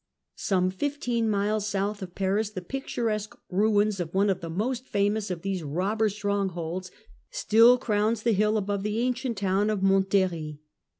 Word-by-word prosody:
Some 185 -2 0
fifteen 240 0 -1
miles 210 0 0
south 205 +1 -2
of 180 -2 -8
Paris 200 +2 0
the 185 -4 -7
picturesque 225 -3 -3
ruins 205 +1 +2
of 175 0 -4
one 200 +1 +3
of 185 - -3
the 165 - -5
most 240 +9 -2
famous 205 +1 0
of 175 -3 -4
these 195 -2 -2
robber 190 +9 0
strongholds 190 -3 -2 0.4
still 245 - +5
crowns 215 -1 0
the 235 - +3
hill 210 +2 +2
above 200 -1 -1
the 210 +2 -2
ancient 250 -2 -1
town 195 +2 +1
of 205 -3 -1
Montlhery. 190 -6 +1
205 Hz, 160 wpm, -27 LUFS, 190-215 Hz, 0.4 s, still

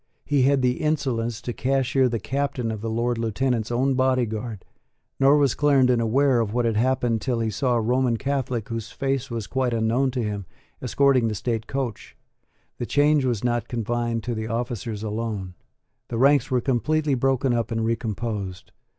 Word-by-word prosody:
He 145 -2 +2
had 135 0 +3
the 125 0 +2
insolence 130 -7 -1
to 120 - -3
cashier 130 0 +1
the 115 - -1
Captain 130 0 -2
of 110 -2 -5
the 115 - -3
Lord 120 +1 -1
Lieutenant's 115 0 -1
own 130 +3 +2
Body 130 -1 +2
Guard: 110 -2 -6 0.5
nor 140 +2 +6
was 140 -4 +3
Clarendon 130 -5 +3
aware 130 +3 +3
of 110 -1 -1
what 120 -1 +1
had 115 -1 +1
happened 120 -1 +1
till 125 -3 -1
he 110 -1 -1
saw 125 +4 0
a 115 - +2
Roman 125 +1 +1
Catholic, 130 -4 -2
whose 115 -1 -4
face 135 -1 -2
was 115 -3 -4
quite 125 +2 -1
unknown 115 +4 +1
to 125 -2 -2
him, 105 -3 -4 0.3
escorting 130 -1 +3
the 110 - -2
state 115 +1 -2
coach. 130 -6 -4 0.6
The 120 - -3
change 145 -1 +3
was 120 -4 -1
not 120 -2 0
confined 120 0 -2
to 120 - -2
the 110 0 -4
officers 115 -2 -3
alone. 105 -4 -3 0.5
The 115 - -4
ranks 140 +1 +4
were 125 -2 +1
completely 145 +4 +1
broken 130 0 +1
up 115 -1 0
and 115 -1 -1
recomposed. 110 -4 -3
120 Hz, 180 wpm, -24 LUFS, 115-130 Hz, 0.6 s, nor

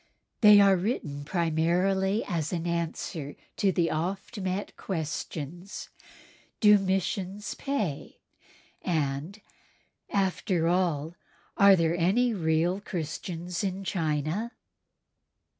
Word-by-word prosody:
They 210 -2 +8
are 195 -1 +6
written 150 - -3
primarily 180 +5 +1
as 165 -5 -2
an 170 -2 -2
answer 165 -3 -3 0.2
to 195 - +3
the 170 -2 +1
oft 190 +7 -3
met 190 +1 -3
questions, 165 +1 -5 0.7
"Do 210 -2 +7
missions 195 +1 -2
pay?" 210 - -3 0.6
and, 155 +3 -2 0.7
"After 185 -3 0
all, 170 -2 0 0.4
are 200 -1 +7
there 165 -1 +1
any 215 +8 +2
real 170 0 +1
Christians 175 0 -4
in 195 0 -2
China?" 165 - -1
180 Hz, 95 wpm, -28 LUFS, 160-195 Hz, 0.7 s, They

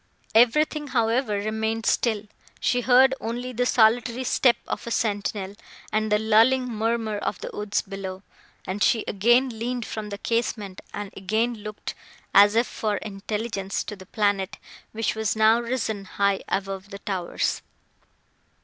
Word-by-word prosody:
Everything, 295 +6 +3
however, 230 -2 +1
remained 220 +2 -2
still; 220 -4 +1 0.4
she 245 - +1
heard 260 +2 +5
only 245 +3 -4
the 245 +1 +1
solitary 240 +2 +3
step 250 -1 +3
of - - -4
a - - -2
sentinel, 205 -3 -1 0.4
and 215 0 0
the 210 - +5
lulling 225 +4 +4
murmur 225 -2 -1
of - - -3
the - - -5
woods 210 -1 -1
below, 190 -1 -7 0.4
and 195 +2 -4
she 225 +3 +3
again 240 +3 +2
leaned 240 0 -2
from 215 -1 -5
the 200 - -5
casement, 215 -4 -2
and 205 -1 -6
again 220 +5 0
looked, 210 0 -7 0.4
as 205 +1 +7
if 230 +2 +4
for 210 -3 -2
intelligence, 205 0 -3
to 210 - -7
the 190 -2 -14
planet, 200 -3 0 0.3
which 225 -1 -1
was 220 -1 -1
now 220 +1 +5
risen 235 -4 -2
high 200 +1 0
above 195 0 -3
the 200 - -7
towers. 190 -3 -2
220 Hz, 150 wpm, -25 LUFS, 200-235 Hz, 0.4 s, as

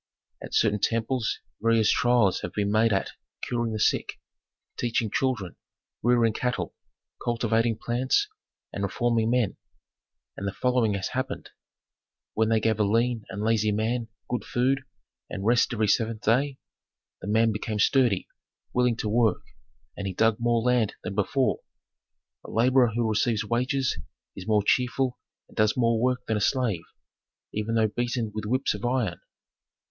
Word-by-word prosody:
"At - - -6
certain 105 -2 +3
temples 115 +2 0 0.2
various 115 -1 +3
trials 120 -6 +3
have 90 - -5
been 100 -1 0
made 110 +1 +3
at 95 - 0 0.3
curing 120 -2 -1
the 110 - -3
sick, - - +1 0.6
teaching 115 -2 -1
children, 110 -10 -1 0.4
rearing 120 -1 +3
cattle, 125 +2 -2 0.5
cultivating 115 -1 +1
plants, 130 - +1 0.5
and 100 - -4
reforming 115 +3 +1
men, 120 -5 +1 0.8
and 100 - -4
the 100 - -2
following 125 -4 +1
has 100 - -3
happened: 130 +1 -4 0.8
When 110 0 +1
they 115 -1 +3
gave 110 0 0
a - - +4
lean 115 +2 +1
and 100 +2 -5
lazy 110 -1 +2
man 115 +3 -1 0.2
good 125 - -2
food, 135 +2 +1 0.5
and 100 0 -5
rest 120 +3 +3
every 110 -2 +1
seventh 110 +1 +1
day, 130 +5 +2 0.6
the - - -7
man 110 +2 +3
became 105 +1 -3
sturdy, 120 -2 +3 0.5
willing 125 -1 +2
to 110 - -3
work, 110 0 +2 0.5
and 100 - -4
he 95 - -4
dug 110 +1 +3
more 120 -1 +1
land 125 -4 +2
than - - -4
before. 125 +6 +1 0.8
A - - -10
laborer 125 +1 +4
who 120 -1 +1
receives 110 0 +1
wages 125 +4 0 0.4
is 95 - -8
more 105 -2 +3
cheerful 125 +1 +1 0.3
and - - -20
does 110 +1 +2
more 115 -2 +2
work 125 0 0
than 110 - 0
a - - -2
slave, 115 -7 +1 0.7
even 110 +2 -2
though 110 -1 +3
beaten 120 0 -2
with 110 -1 -4
whips 130 +4 +1
of 105 - -7
iron. 120 -7 -1
115 Hz, 155 wpm, -26 LUFS, 105-125 Hz, 0.8 s, a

